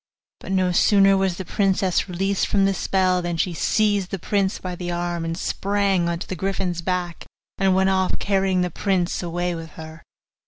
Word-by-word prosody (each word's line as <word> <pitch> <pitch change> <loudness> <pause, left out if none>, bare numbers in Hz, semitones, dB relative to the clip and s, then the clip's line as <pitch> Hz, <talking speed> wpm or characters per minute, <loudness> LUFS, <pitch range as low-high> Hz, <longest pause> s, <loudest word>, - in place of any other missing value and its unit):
But - - -8
no 185 -1 +2
sooner 195 +2 +5
was 190 -2 0
the 190 - -5
princess 190 -1 +1
released 195 +2 0
from 195 -1 +2
the 195 - +2
spell, 185 -1 +1
than 175 -1 -3
she 175 +2 0
seized 205 +1 +1
the 195 - -3
prince 195 +1 0
by 185 -1 -6
the 175 0 -5
arm 175 -1 -2
and 165 0 -3
sprang 195 -3 0
on 170 - -1
to 170 - -7
the 185 - -4
griffin's 180 -1 -2
back, 180 -1 -3 0.3
and 190 -1 +3
went 190 0 +3
off 190 -1 +1
carrying 195 -2 +1
the 180 -1 -1
prince 185 -1 -1
away 175 0 -2
with 165 -1 -7
her. 160 +1 -10
185 Hz, 195 wpm, -22 LUFS, 175-195 Hz, 0.3 s, sooner